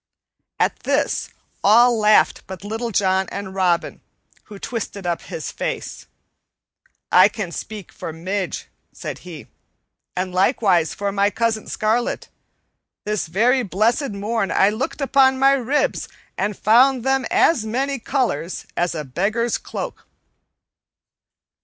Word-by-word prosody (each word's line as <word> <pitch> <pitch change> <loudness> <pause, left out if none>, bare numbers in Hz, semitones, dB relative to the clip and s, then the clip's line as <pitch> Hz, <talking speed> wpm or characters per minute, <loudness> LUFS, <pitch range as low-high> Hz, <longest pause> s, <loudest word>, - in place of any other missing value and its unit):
At - - +1
this - - 0 0.3
all 235 +4 +6
laughed 215 -1 +3
but 190 0 -8
Little 225 +3 -3
John 190 -2 +1
and 195 -1 -6
Robin, 180 -3 0 0.4
who 210 - -11
twisted 205 -3 -5
up 170 -1 -1
his 160 - -6
face. - - -5 1.0
"I 185 +3 +7
can 205 -5 -5
speak 210 0 -7
for - - -7
Midge," 185 +3 -3 0.3
said - - -7
he, 160 -9 -10 0.7
"and 185 0 -2
likewise 185 - +2
for 200 0 -2
my 200 +1 +2
cousin 225 0 -1
Scarlet. 225 +3 -1 0.8
This 210 -5 -1
very 235 +10 +3
blessed 230 - +1
morn 205 0 -2
I 195 - +4
looked 260 +6 -3
at 270 - -5
my 270 0 +5
ribs 275 - 0 0.3
and 205 0 -2
found 250 +3 +4
them 265 0 +1
as 290 -9 +3
many 265 +5 -2
colors 225 - -2
as 175 -1 0
a 155 -2 -4
beggar's 210 - -1
cloak." - - -7
210 Hz, 130 wpm, -21 LUFS, 190-240 Hz, 1.0 s, I